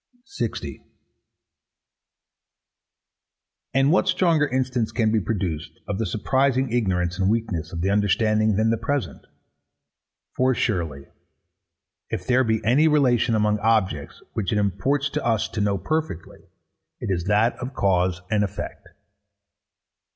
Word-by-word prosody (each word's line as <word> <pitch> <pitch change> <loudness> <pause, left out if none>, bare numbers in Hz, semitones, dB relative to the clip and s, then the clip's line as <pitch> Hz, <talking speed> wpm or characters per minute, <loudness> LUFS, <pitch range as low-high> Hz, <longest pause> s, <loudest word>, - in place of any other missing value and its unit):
60. 400 - -5 2.9
And 135 +2 +3
what 180 - +3
stronger 165 -5 +3
instance 130 -3 -1
can 110 -3 +1
be 110 - +3
produced 90 -7 -3
of 100 - -3
the 115 - -1
surprising 130 +5 +1
ignorance 90 -6 0
and 95 0 +2
weakness 105 -8 -2
of 85 - -4
the 95 +3 +1
understanding 110 +1 +2
than 110 +2 +2
the 115 - 0
present? 140 +3 -3 1.1
For 130 0 +2
surely, 80 - -2 1.0
if 90 - -4
there 130 +4 +3
be 110 -3 -1
any 135 +8 +4
relation 130 -6 +3
among 105 0 +1
objects 105 -9 0
which 100 -5 -2
it 105 - +1
imports 105 +9 0
to - - -2
us 115 -3 +1
to 110 - -3
know 100 -1 +1
perfectly, 155 - -3 0.6
it - - -3
is 85 -1 -3
that 105 +4 +3
of 130 +2 -6
cause 90 -2 +1
and 105 -1 +2
effect. 100 0 -6
110 Hz, 130 wpm, -23 LUFS, 95-130 Hz, 2.9 s, any